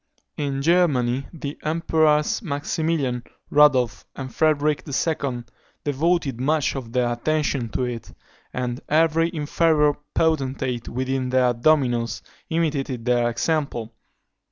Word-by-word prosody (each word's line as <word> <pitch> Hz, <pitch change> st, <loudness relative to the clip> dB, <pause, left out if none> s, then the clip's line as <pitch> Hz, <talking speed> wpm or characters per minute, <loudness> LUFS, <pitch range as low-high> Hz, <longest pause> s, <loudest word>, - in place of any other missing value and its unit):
In 140 Hz, -2 st, -2 dB
Germany, 140 Hz, -7 st, +2 dB
the 145 Hz, -3 st, -7 dB
Emperors 155 Hz, 0 st, +2 dB
Maximilian, 145 Hz, -, -1 dB, 0.3 s
Rudolph, 130 Hz, -7 st, +4 dB
and 130 Hz, -3 st, -7 dB
Frederic 150 Hz, 0 st, +2 dB
II. 140 Hz, -4 st, -1 dB, 0.4 s
devoted 145 Hz, -3 st, 0 dB
much 150 Hz, +1 st, +1 dB
of 125 Hz, -4 st, -6 dB
their 125 Hz, -1 st, +1 dB
attention 140 Hz, -2 st, -1 dB
to 130 Hz, -, -2 dB
it; 120 Hz, -2 st, -5 dB, 0.4 s
and 125 Hz, 0 st, -3 dB
every 165 Hz, +1 st, +3 dB
inferior 150 Hz, -1 st, +2 dB, 0.2 s
potentate 135 Hz, -6 st, 0 dB
within 130 Hz, +1 st, -2 dB
their 125 Hz, -1 st, +3 dB
dominions 120 Hz, -3 st, +1 dB, 0.3 s
imitated 145 Hz, -7 st, -1 dB
their 120 Hz, -1 st, +2 dB
example. 120 Hz, -3 st, -2 dB
140 Hz, 105 wpm, -23 LUFS, 125-155 Hz, 0.4 s, Rudolph